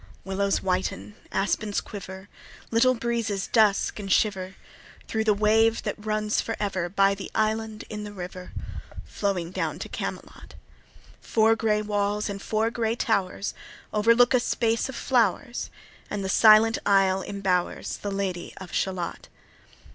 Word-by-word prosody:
Willows 195 Hz, +1 st, 0 dB
whiten, 180 Hz, -, -2 dB, 0.2 s
aspens 205 Hz, +1 st, 0 dB
quiver, 190 Hz, -1 st, -9 dB, 0.4 s
Little 255 Hz, +3 st, +4 dB
breezes 230 Hz, -4 st, -1 dB
dusk 215 Hz, -2 st, +2 dB
and 195 Hz, -2 st, -5 dB
shiver 190 Hz, -2 st, +1 dB, 0.5 s
Thro' 220 Hz, -1 st, -1 dB
the 215 Hz, -2 st, +3 dB
wave 220 Hz, +2 st, +3 dB
that 210 Hz, -, -4 dB
runs 215 Hz, 0 st, 0 dB
for 225 Hz, -, -3 dB
ever 190 Hz, -4 st, -1 dB
By 195 Hz, +1 st, +3 dB
the 195 Hz, 0 st, -7 dB
island 220 Hz, 0 st, -1 dB
in 210 Hz, -1 st, -6 dB
the 210 Hz, -, -7 dB
river 180 Hz, -1 st, -8 dB, 0.5 s
Flowing 185 Hz, -4 st, -2 dB
down -, -, -2 dB
to -, -, -6 dB
Camelot. -, -, -7 dB, 0.7 s
Four 225 Hz, 0 st, +3 dB
gray 215 Hz, -1 st, +1 dB
walls, 205 Hz, 0 st, -1 dB
and 200 Hz, 0 st, -6 dB
four 220 Hz, +2 st, 0 dB
gray 230 Hz, -1 st, -1 dB
towers, 200 Hz, -4 st, -1 dB, 0.4 s
Overlook 230 Hz, +4 st, +5 dB
a 250 Hz, -, +5 dB
space 230 Hz, 0 st, 0 dB
of 265 Hz, -, -6 dB
flowers, 240 Hz, +1 st, 0 dB, 0.4 s
And 200 Hz, -2 st, -3 dB
the -, -, -2 dB
silent 220 Hz, +2 st, +6 dB
isle 195 Hz, -1 st, +3 dB
imbowers 190 Hz, -3 st, -1 dB
The 205 Hz, -, -3 dB
Lady 195 Hz, -3 st, -3 dB
of 185 Hz, -2 st, -10 dB
Shalott. 185 Hz, -3 st, -2 dB
210 Hz, 140 wpm, -26 LUFS, 195-225 Hz, 0.7 s, silent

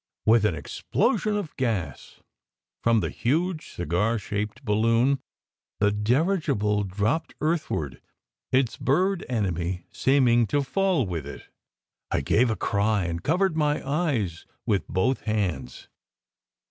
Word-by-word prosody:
With 110 Hz, -1 st, +5 dB
an 100 Hz, -6 st, +2 dB
explosion 210 Hz, -, 0 dB
of 175 Hz, -8 st, -5 dB
gas 105 Hz, -, -3 dB, 0.6 s
from 115 Hz, -2 st, +3 dB
the 80 Hz, -, -2 dB
huge 160 Hz, +6 st, -1 dB
cigar 90 Hz, +8 st, 0 dB
shaped 105 Hz, 0 st, -4 dB
balloon, 115 Hz, +6 st, +3 dB, 0.6 s
the 105 Hz, 0 st, +3 dB
dirigible 110 Hz, -, +1 dB
dropped 105 Hz, -, -1 dB
earthward, 150 Hz, -, -2 dB, 0.5 s
its 130 Hz, -2 st, +2 dB
bird 185 Hz, +7 st, +1 dB
enemy 90 Hz, -6 st, -2 dB
seeming 125 Hz, -4 st, +3 dB
to 145 Hz, +4 st, +1 dB
fall 185 Hz, -, +1 dB
with 85 Hz, -6 st, -4 dB
it. 70 Hz, -, -8 dB, 0.7 s
I -, -, 0 dB
gave 115 Hz, -, +3 dB
a 110 Hz, -, 0 dB
cry 105 Hz, -1 st, +1 dB
and 85 Hz, -1 st, -3 dB
covered 180 Hz, -, +1 dB
my 150 Hz, -3 st, 0 dB
eyes 135 Hz, -, -1 dB, 0.2 s
with 100 Hz, -3 st, 0 dB
both 125 Hz, +8 st, 0 dB
hands. 90 Hz, -, -2 dB
115 Hz, 120 wpm, -26 LUFS, 100-145 Hz, 0.7 s, With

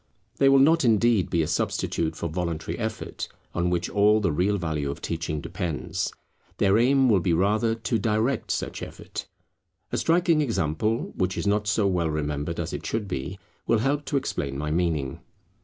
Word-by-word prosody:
They 135 Hz, -, +5 dB
will 135 Hz, -, +6 dB
not 160 Hz, +4 st, +5 dB
indeed 115 Hz, -3 st, +3 dB
be 85 Hz, -1 st, +2 dB
a -, -, -2 dB
substitute 80 Hz, -1 st, -1 dB
for 85 Hz, -, -3 dB
voluntary 85 Hz, -1 st, -3 dB
effort, 110 Hz, -2 st, -4 dB, 0.3 s
on 90 Hz, 0 st, 0 dB
which 90 Hz, -1 st, 0 dB
all 105 Hz, +1 st, +4 dB
the 100 Hz, -6 st, +1 dB
real 95 Hz, +7 st, +1 dB
value 80 Hz, -5 st, -2 dB
of 70 Hz, -, -5 dB
teaching 80 Hz, -2 st, -3 dB
depends. 75 Hz, -6 st, -3 dB, 0.5 s
Their 100 Hz, +2 st, +4 dB
aim 135 Hz, +2 st, +4 dB
will 105 Hz, -5 st, +4 dB
be 85 Hz, -1 st, +1 dB
rather 105 Hz, +6 st, +2 dB
to 115 Hz, 0 st, -1 dB
direct 110 Hz, +3 st, 0 dB
such -, -, -2 dB
effort. -, -, -7 dB, 0.6 s
A -, -, -1 dB
striking 165 Hz, -1 st, +3 dB
example, 110 Hz, -, -1 dB
which 95 Hz, -1 st, -1 dB
is -, -, -2 dB
not 105 Hz, +1 st, +1 dB
so 105 Hz, 0 st, +2 dB
well 90 Hz, -4 st, +1 dB
remembered 75 Hz, -1 st, -2 dB
as -, -, -3 dB
it -, -, -4 dB
should 110 Hz, -2 st, -2 dB
be, 85 Hz, +2 st, -4 dB, 0.3 s
will 115 Hz, -, +4 dB
help 140 Hz, +6 st, 0 dB
to 140 Hz, -, 0 dB
explain 70 Hz, -, -3 dB
my 75 Hz, +1 st, -2 dB
meaning. 80 Hz, -5 st, 0 dB
100 Hz, 180 wpm, -26 LUFS, 80-115 Hz, 0.6 s, will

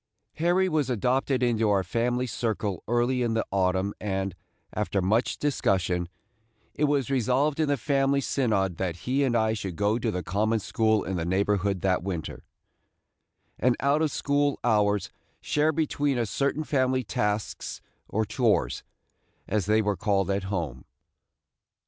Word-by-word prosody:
Harry 175 Hz, +3 st, +2 dB
was 155 Hz, -6 st, 0 dB
adopted 125 Hz, +3 st, +1 dB
into 115 Hz, -3 st, +2 dB
our 100 Hz, -2 st, +3 dB
family 120 Hz, +6 st, 0 dB
circle 110 Hz, -6 st, -2 dB
early 120 Hz, +2 st, +1 dB
in 115 Hz, -2 st, 0 dB
the 110 Hz, -, 0 dB
autumn 95 Hz, +1 st, +1 dB
and, 95 Hz, -2 st, -2 dB, 0.4 s
after 100 Hz, -2 st, -1 dB
much 105 Hz, +6 st, +1 dB
discussion, 90 Hz, -, 0 dB, 0.6 s
it 150 Hz, -, +1 dB
was 140 Hz, -3 st, 0 dB
resolved 135 Hz, +4 st, +1 dB
in 155 Hz, -, +2 dB
the 145 Hz, 0 st, +1 dB
family 135 Hz, +2 st, +1 dB
synod 105 Hz, -10 st, 0 dB
that 90 Hz, -3 st, -2 dB
he 135 Hz, +3 st, +1 dB
and 125 Hz, -3 st, +1 dB
I 110 Hz, -1 st, +2 dB
should 100 Hz, -5 st, -4 dB
go 105 Hz, +4 st, +1 dB
to 115 Hz, -, -1 dB
the 90 Hz, -4 st, -3 dB
common 105 Hz, +7 st, +1 dB
school 110 Hz, 0 st, +1 dB
in 95 Hz, 0 st, -3 dB
the 80 Hz, -, -1 dB
neighborhood 100 Hz, +1 st, 0 dB
that 95 Hz, -2 st, +1 dB
winter, 90 Hz, -4 st, -5 dB, 1.2 s
and 125 Hz, +1 st, +2 dB
out 140 Hz, +3 st, +2 dB
of 160 Hz, -, +2 dB
school 145 Hz, 0 st, 0 dB
hours 105 Hz, -4 st, +2 dB, 0.3 s
share 150 Hz, +1 st, +1 dB
between 145 Hz, -3 st, 0 dB
us 115 Hz, -3 st, -1 dB
certain 140 Hz, +3 st, 0 dB
family 130 Hz, -3 st, +1 dB
tasks 105 Hz, -1 st, -2 dB, 0.3 s
or 110 Hz, +1 st, 0 dB
"chores," 110 Hz, +1 st, +1 dB, 0.7 s
as 100 Hz, -2 st, 0 dB
they 110 Hz, +1 st, +3 dB
were 105 Hz, -1 st, 0 dB
called 100 Hz, -3 st, +1 dB
at 95 Hz, 0 st, -1 dB
home. 85 Hz, -10 st, -3 dB
110 Hz, 155 wpm, -27 LUFS, 100-130 Hz, 1.2 s, our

